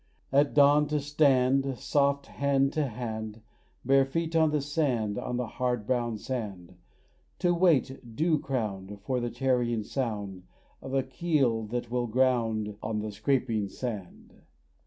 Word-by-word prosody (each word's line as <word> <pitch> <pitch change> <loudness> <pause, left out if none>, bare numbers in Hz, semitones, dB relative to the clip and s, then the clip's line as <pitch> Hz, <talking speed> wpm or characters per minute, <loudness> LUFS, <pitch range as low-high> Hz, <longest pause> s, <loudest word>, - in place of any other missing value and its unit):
At 140 +1 +3
dawn 145 +1 +6
to 150 0 0
stand 135 -2 +2
Soft 140 +1 +1
hand 140 -1 +1
to 155 -3 0
hand, 110 -2 -6 0.4
Bare 135 +1 +5
feet 165 +4 -2
on 160 -1 +4
the 150 0 +1
sand, 135 -8 -1
On 125 - -3
the 125 - -1
hard 125 -1 -2
brown 120 -2 0
sand, 100 -8 -5 0.6
To 175 -1 +2
wait, 135 -9 +1
dew 160 +1 +2
crowned, 105 -7 -4
For 125 +4 -1
the 120 0 -2
tarrying 120 -2 0
sound 105 -7 -4 0.3
Of 135 - -5
a 135 - +2
keel 130 -5 0
that 120 +1 -4
will 120 -1 0
ground 115 -4 +1
On 110 0 -2
the 105 0 -3
scraping 110 -1 0
sand. 105 -6 -7
125 Hz, 145 wpm, -28 LUFS, 110-140 Hz, 0.6 s, dawn